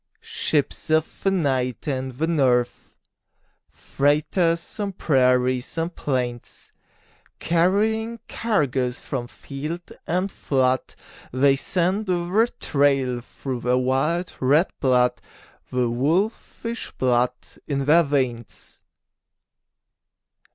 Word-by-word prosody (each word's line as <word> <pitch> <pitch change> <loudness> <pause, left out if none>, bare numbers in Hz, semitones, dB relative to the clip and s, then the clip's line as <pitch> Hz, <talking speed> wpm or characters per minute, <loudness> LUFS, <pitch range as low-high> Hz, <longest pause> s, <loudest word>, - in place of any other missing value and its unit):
Ships 150 +1 -1
of 155 0 0
the 195 - +2
night 135 - -1
and 130 -2 -2
the 150 +6 -1
north, 125 -7 +1 0.7
Freighters 165 +6 0
on 200 -2 -2
prairies 130 -4 +1
and 165 +1 -2
plains, 125 -4 -4 0.6
Carrying 215 +7 +1
cargoes 135 - 0
from 125 -4 -5
field 150 +7 -7 0.2
and 185 +4 0
flood 130 -2 0 0.4
They 135 +2 +4
scent 185 +8 0
the 185 +6 +1
trail 135 -4 +1
through 130 +1 -6
their 125 +1 +1
wild 135 +8 0
red 145 +7 +3
blood, 125 -2 +2 0.5
The 125 -1 +1
wolfish 185 - -1
blood 125 -1 +2 0.3
in 140 -2 -1
their 160 +4 +6
veins. 130 - -3
140 Hz, 95 wpm, -23 LUFS, 125-170 Hz, 0.7 s, their